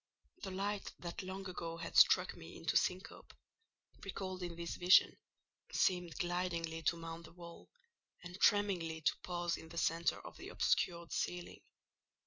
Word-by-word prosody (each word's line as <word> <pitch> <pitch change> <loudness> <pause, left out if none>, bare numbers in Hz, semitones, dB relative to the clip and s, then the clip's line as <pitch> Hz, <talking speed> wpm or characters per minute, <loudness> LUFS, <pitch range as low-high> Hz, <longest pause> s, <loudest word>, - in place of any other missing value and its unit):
The - - -4
light 200 +2 -3
that 175 +2 -5
long 190 +1 -6
ago 165 -2 -5
had 165 - -6
struck - - +6
me - - -10
into - - -2
syncope, - - -1 0.7
recalled 185 -1 -5
in 175 -1 -4
this 170 0 -4
vision, 180 +1 +6 0.6
seemed 180 -2 +1
glidingly 175 -3 -1
to 170 +2 +1
mount 165 0 -7
the 160 - -14
wall, 170 -1 -12 0.5
and 180 0 -8
tremblingly 180 -6 +3
to 140 -3 +2
pause 175 -1 -2
in 160 - -11
the 170 - -9
centre 165 +1 +1
of - - -9
the - - -8
obscured 170 -1 +1
ceiling. 175 0 -3
175 Hz, 150 wpm, -36 LUFS, 165-185 Hz, 0.7 s, struck